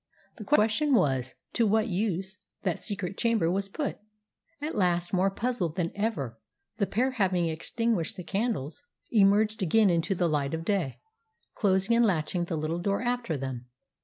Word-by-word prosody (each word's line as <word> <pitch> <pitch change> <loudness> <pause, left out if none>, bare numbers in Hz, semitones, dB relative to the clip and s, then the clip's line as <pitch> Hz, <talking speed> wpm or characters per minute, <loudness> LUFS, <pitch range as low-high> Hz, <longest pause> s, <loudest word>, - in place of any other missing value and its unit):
The 220 - -7
question 270 +4 +3
was, 130 - +1 0.2
to 230 -2 +3
what 215 +1 +3
use 190 0 -2 0.2
that 180 -5 0
secret 195 -2 -5
chamber 225 -8 +2
was 195 +1 -1
put? 285 +8 -3 0.6
At 300 +2 -3
last, 175 -3 +1
more 190 +1 +3
puzzled 195 -6 -2
than 170 -3 -1
ever, 155 - -2 0.4
the 200 -3 +1
pair, 255 +5 +1
having 190 -7 +1
extinguished 175 +3 -1
the 180 - -6
candles, 200 - -2 0.3
emerged 210 0 +4
again 195 +3 +4
into 170 +3 +1
the 175 -1 +1
light 145 -1 0
of 165 0 -6
day, 185 -10 0 0.6
closing 195 +2 +2
and 235 - +5
latching 175 -3 +1
the 170 -2 -3
little 155 +3 -2
door 200 +5 0
after 240 -9 -1
them. 130 -2 -5
195 Hz, 160 wpm, -28 LUFS, 165-220 Hz, 0.6 s, and